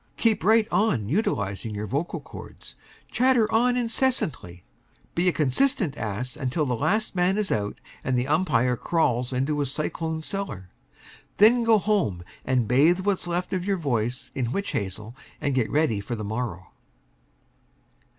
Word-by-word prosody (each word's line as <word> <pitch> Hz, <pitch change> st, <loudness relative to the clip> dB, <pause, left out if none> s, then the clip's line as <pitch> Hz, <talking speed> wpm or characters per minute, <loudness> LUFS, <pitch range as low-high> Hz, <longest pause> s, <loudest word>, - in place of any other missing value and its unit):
Keep 225 Hz, -7 st, +2 dB
right 220 Hz, +2 st, +4 dB
on 175 Hz, -, +1 dB
utilizing 105 Hz, -, -1 dB
your 105 Hz, +1 st, -3 dB
vocal 140 Hz, -, -2 dB
chords. -, -, -12 dB, 0.4 s
Chatter 250 Hz, -2 st, +4 dB
on 245 Hz, +2 st, +3 dB
incessantly. 230 Hz, -, -1 dB, 0.5 s
Be 175 Hz, +2 st, +1 dB
a -, -, +2 dB
consistent 155 Hz, -, +1 dB
ass 115 Hz, +3 st, -4 dB
until 135 Hz, +4 st, -1 dB
the 125 Hz, -, -1 dB
last 215 Hz, -, 0 dB
man 180 Hz, +2 st, +2 dB
is 210 Hz, -2 st, -1 dB
out 105 Hz, -1 st, -2 dB, 0.2 s
and 130 Hz, -1 st, 0 dB
the 125 Hz, +2 st, 0 dB
umpire 145 Hz, -6 st, +2 dB
crawls 125 Hz, -4 st, 0 dB
into 135 Hz, +4 st, 0 dB
his 140 Hz, -3 st, -1 dB
cyclone 160 Hz, +2 st, -3 dB
cellar. 135 Hz, -, -5 dB, 0.7 s
Then 235 Hz, +4 st, +6 dB
go 225 Hz, -1 st, +5 dB
home 190 Hz, -, 0 dB, 0.2 s
and 125 Hz, -3 st, +1 dB
bathe 155 Hz, -, +4 dB
what's 195 Hz, -2 st, -1 dB
left 175 Hz, +2 st, -2 dB
of 185 Hz, -2 st, -1 dB
your 195 Hz, 0 st, 0 dB
voice 125 Hz, -5 st, -2 dB
in 120 Hz, -3 st, -2 dB
witch 200 Hz, +6 st, -2 dB
hazel, 105 Hz, +4 st, -4 dB, 0.2 s
and 145 Hz, -, -1 dB
get 125 Hz, -4 st, +1 dB
ready 145 Hz, -9 st, +1 dB
for 105 Hz, +4 st, -4 dB
the 110 Hz, -, -5 dB
morrow. 105 Hz, -4 st, -4 dB
145 Hz, 155 wpm, -25 LUFS, 120-195 Hz, 0.7 s, Then